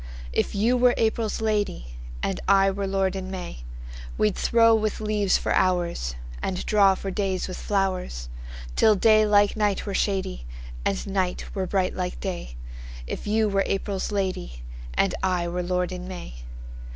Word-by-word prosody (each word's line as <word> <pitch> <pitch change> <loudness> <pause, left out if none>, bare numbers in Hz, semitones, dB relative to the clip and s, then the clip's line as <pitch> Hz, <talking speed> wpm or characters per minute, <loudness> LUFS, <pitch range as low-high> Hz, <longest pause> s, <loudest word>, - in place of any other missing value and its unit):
If - - 0
you 230 +5 +3
were 245 0 +4
April's 220 -1 0
lady, 205 - -1 0.3
And - - -1
I 195 0 +5
were 200 0 -3
lord 195 -1 0
in 190 -1 -4
May, 180 - -6 0.6
We'd 105 - +2
throw 230 -1 +4
with 215 -1 0
leaves 210 -2 +2
for - - -3
hoursAnd - - -1
draw 200 -2 +5
for 195 +1 -5
days 190 -1 -1
with 185 - -6
flowers, 185 - -1 0.5
Till 215 - +5
day 215 +1 +5
like 205 -1 +4
night 210 -2 0
were 200 - -3
shadyAnd - - -3
night 190 -2 -1
were 190 -2 -2
bright 185 0 0
like 180 -1 -3
day; 175 - -5 0.5
If 65 - -5
you 215 +1 +2
were 195 -1 +1
April's 195 0 -2
lady, 185 - -3 0.3
And 195 - +2
I 180 -2 0
were 175 +1 -2
lord 180 0 -1
in 180 0 -6
May. 180 - -7
190 Hz, 155 wpm, -25 LUFS, 180-205 Hz, 0.6 s, I